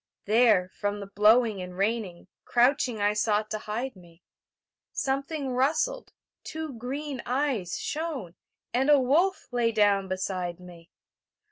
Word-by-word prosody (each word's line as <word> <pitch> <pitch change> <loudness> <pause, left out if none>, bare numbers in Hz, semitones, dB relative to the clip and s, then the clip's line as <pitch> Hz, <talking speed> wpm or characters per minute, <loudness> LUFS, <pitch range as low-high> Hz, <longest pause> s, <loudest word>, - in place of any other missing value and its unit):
There, 215 -4 +4
from 205 0 -2
the 200 - -6
blowing 210 +1 +3
and 180 0 -8
raining, 200 -4 -2 0.2
Crouching 245 -2 +2
I 205 +1 +2
sought 210 0 0
to 215 - -2
hide 230 +5 -4
me; 175 -2 -18 0.7
Something 275 0 -2
rustled, 315 - 0 0.3
two 315 -2 -5
green 265 +3 -5
eyes 250 -9 -1
shone, 295 - -4 0.4
And 265 +4 +2
a 290 -1 +7
wolf 330 +10 +2
lay 240 -2 +1
down 205 -3 +3
beside 185 -2 -3
me. 175 -2 -14
225 Hz, 130 wpm, -27 LUFS, 195-270 Hz, 0.7 s, a